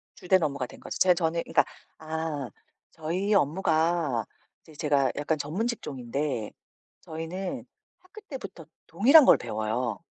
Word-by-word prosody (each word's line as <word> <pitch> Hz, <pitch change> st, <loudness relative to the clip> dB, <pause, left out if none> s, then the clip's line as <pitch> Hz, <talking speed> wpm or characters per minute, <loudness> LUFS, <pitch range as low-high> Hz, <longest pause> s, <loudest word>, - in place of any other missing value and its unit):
주된 185 Hz, -1 st, +2 dB
업무가 140 Hz, -4 st, -1 dB
된 -, -, -13 dB
거죠. -, -, -6 dB
제 185 Hz, -1 st, +6 dB
저는 170 Hz, -1 st, 0 dB
그러니까 -, -, +2 dB, 0.3 s
아 155 Hz, -4 st, -4 dB, 0.4 s
저희 180 Hz, +6 st, -2 dB
업무가 160 Hz, -, +1 dB, 0.4 s
이제 155 Hz, -, -17 dB
제가 140 Hz, -4 st, +1 dB
약간 155 Hz, +2 st, 0 dB
전문 170 Hz, +11 st, -2 dB
직종인데 135 Hz, -, -3 dB, 0.5 s
저희는 165 Hz, +4 st, -5 dB, 0.3 s
학교 390 Hz, +4 st, -14 dB
때부터 255 Hz, -, -9 dB, 0.2 s
동일한 260 Hz, -, +7 dB
걸 -, -, +7 dB
배워요. 110 Hz, +1 st, -2 dB
160 Hz, 285 characters per minute, -27 LUFS, 140-185 Hz, 0.5 s, 동일한